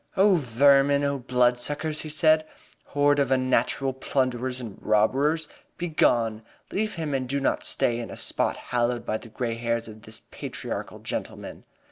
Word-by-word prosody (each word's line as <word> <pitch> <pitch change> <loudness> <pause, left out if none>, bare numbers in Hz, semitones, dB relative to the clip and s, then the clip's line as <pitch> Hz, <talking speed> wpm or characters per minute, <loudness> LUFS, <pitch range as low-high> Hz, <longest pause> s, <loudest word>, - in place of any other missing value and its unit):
"Oh, 195 +1 +6
vermin! 140 0 +4
Oh, 140 -1 0
bloodsuckers!" 125 +5 +1
he 155 - -6
said. 155 +1 +4 0.4
"Horde 145 0 +2
of 140 -2 +2
unnatural 130 0 +1
plunderers 130 -1 -1
and 115 -6 -8
robbers! 140 +9 +2 0.3
Begone! 120 -10 +1 0.3
Leave 215 +1 -1
him 160 -4 -3
and 130 -2 -2
do 140 +1 0
not 135 - 0
stay 120 0 +1
in 115 - -5
a - - -8
spot - - -1 0.2
hallowed 120 0 +1
by 110 - -1
the 115 - -12
gray 115 +1 -3
hairs 115 0 -2
of 110 0 -11
this 110 -1 -6
patriarchal - - -5
gentleman!" - - -6
130 Hz, 155 wpm, -26 LUFS, 120-145 Hz, 0.4 s, Oh